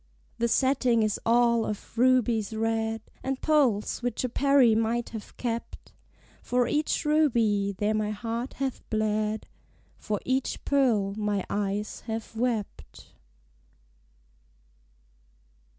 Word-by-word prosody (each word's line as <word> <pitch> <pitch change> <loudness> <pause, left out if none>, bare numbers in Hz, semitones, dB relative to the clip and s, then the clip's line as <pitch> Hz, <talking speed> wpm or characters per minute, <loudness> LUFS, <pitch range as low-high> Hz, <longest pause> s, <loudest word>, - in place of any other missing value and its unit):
The 235 - +2
setting 250 -2 +2
is 215 -1 0
all 235 0 +4
of 210 +1 -6
rubies 235 -3 +2
red, 225 0 -1 0.2
And 265 0 -3
pearls 265 -11 +2
which 245 -1 -2
a 255 - -1
Peri 275 -2 +4
might 230 +2 0
have 220 -2 -9
kept. 235 -1 -5 0.5
For 245 -1 +1
each 300 +1 0
ruby 230 -10 +2
there 210 +2 +1
my 215 -1 0
heart 230 +4 -4
hath 270 -2 -3
bled: 215 0 -1 0.5
For 210 -1 -2
each 260 +1 -1
pearl 230 -9 +2
my 210 -2 -1
eyes 205 +1 -2
have 225 0 -5
wept. 215 - -4
225 Hz, 115 wpm, -27 LUFS, 215-250 Hz, 0.5 s, all